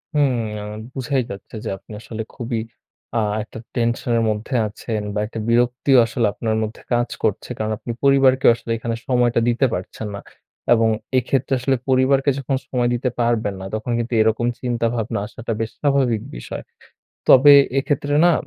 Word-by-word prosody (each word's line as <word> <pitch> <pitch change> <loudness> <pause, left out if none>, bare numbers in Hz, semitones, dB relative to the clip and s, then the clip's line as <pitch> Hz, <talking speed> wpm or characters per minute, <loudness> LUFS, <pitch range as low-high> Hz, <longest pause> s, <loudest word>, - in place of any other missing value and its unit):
হুম। 145 -3 +3 0.3
আ - - -6 0.3
বুঝাই 135 0 0
যাচ্ছে 100 +3 -9
যে - - -2
আপনি - - -17
আসলে 110 0 -6
খুবই 120 -2 -3 0.6
আ - - +3 0.2
একটা 110 - -10 0.2
টেনশন 120 0 0
এর 115 - +1
মধ্যে 110 +5 -3
আছেন 105 +1 -4
বা 105 - -1
একটা 110 - -6
বিরক্তিও 125 +3 +3
আসলে 115 0 -1
আপনার 110 -1 -1
মধ্যে 110 +1 -6
কাজ 120 -1 +1
করছে। - - -1
কারণ 110 0 -2
আপনি 120 - -6
পরিবারকে 135 -1 +4
আসলে 115 - -7
এখানে 115 0 -3
সময়টা 120 -2 +2
দিতে 120 +3 +2
পারছেন 90 +4 -5
না। 100 - -7 0.5
এবং 115 -1 +3 0.3
এইক্ষেত্রে 135 +2 0
আসলে 130 +2 +1
পরিবারকে 135 +2 +3
যখন 135 0 -1
সময় 125 -2 0
দিতে 125 +1 0
পারবেন 115 -3 +1
না - - -6
তখন 110 +3 -3
কিন্তু 120 +1 -3
এরকম 110 +2 +2
চিন্তা 120 -2 0
ভাবনা 115 -3 -2
আসাটা 115 +2 -6
বেশ 115 0 -2
স্বাভাবিক 135 -6 +2 0.2
বিষয়। - - -7 0.6
তবে 145 +2 +9 0.3
এক্ষেত্রে 145 0 -1
না 175 - +6
120 Hz, 170 wpm, -21 LUFS, 110-130 Hz, 0.6 s, তবে